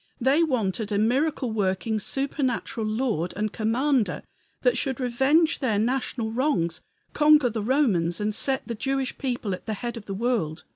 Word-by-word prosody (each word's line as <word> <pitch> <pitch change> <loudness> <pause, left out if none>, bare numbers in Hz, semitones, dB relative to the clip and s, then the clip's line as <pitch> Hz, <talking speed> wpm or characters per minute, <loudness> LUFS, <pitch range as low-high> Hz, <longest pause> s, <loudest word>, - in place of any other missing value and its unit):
They 270 +6 +3
wanted 220 - 0
a 205 - +1
miracle 255 +4 +1
working, 205 +1 0
supernatural 260 -2 -2
Lord 215 -7 -1
and 215 0 -2
Commander 235 -1 0 0.4
that - - +3
should 270 -2 -1
revenge 270 +6 +2
their 230 -7 +1
national 235 0 -1
wrongs, 220 - 0 0.3
conquer 300 -4 +5
the 220 -1 -3
Romans, 205 - +1
and 210 0 -1
set 265 +4 -1
the 235 - -3
Jewish 270 +3 -2
people 240 -7 -2
at 185 - -8
the 220 - -1
head 235 +3 -5
of 215 - -9
the 195 - -5
world. 200 -8 -1
235 Hz, 160 wpm, -25 LUFS, 210-270 Hz, 0.4 s, conquer